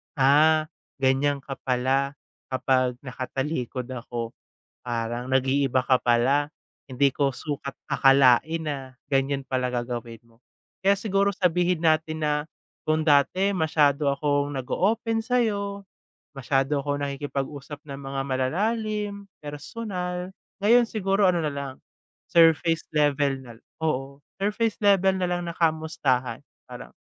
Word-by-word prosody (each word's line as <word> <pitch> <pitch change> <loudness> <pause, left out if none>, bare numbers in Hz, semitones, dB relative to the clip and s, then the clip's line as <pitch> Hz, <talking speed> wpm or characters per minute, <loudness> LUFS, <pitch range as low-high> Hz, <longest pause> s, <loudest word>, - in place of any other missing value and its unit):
ah, 150 +3 +5 0.4
ganiyan 135 +1 +2
ka 135 -1 -7
pala 130 +2 +1 0.3
kapag 130 -1 +1
nakatalikod 130 0 -4
ako 120 -2 -5 0.5
parang 120 +1 -3
nag-iiba 130 0 +2
ka 130 -1 +3
pala. 130 +5 +3 0.4
Hindi 135 +2 +2
ko 140 0 +1
sukat 140 0 -5 0.2
akalain 135 +4 +4
na 135 -4 -5 0.2
ganiyan 135 0 +1
pala 130 -1 -1
gagawin 120 -2 -4
mo. 115 0 -26 0.4
Kaya 200 +1 +5
siguro 200 -1 +1
sabihin 180 -1 +1
natin 155 -1 +1
na 150 -1 +2 0.5
kung 155 0 +2
dati 155 +6 +3
masyado 150 -5 +2
akong 145 0 0
nag-o-open 220 - 0
sa'yo, 205 -5 0 0.5
masyado 135 +1 0
akong 145 0 -2
nakikipag-usap 140 +1 -4
ng 140 -1 -7
mga 135 0 -4
malalalim, 200 - -2
personal, 180 +3 -5 0.3
ngayon 235 +4 +6
siguro 195 -2 +2
ano 175 -2 0
nalang, 140 -2 -5 0.5
surface 165 -1 +4
level 145 -2 +2
na, 125 -3 -11 0.3
oo, 140 -3 -2 0.2
surface 210 +1 +1
level 195 -2 +4
nalang 175 -1 -1
na 170 - -5
kamustahan, 150 -7 0 0.3
parang - - -9
145 Hz, 115 wpm, -25 LUFS, 130-180 Hz, 0.5 s, ngayon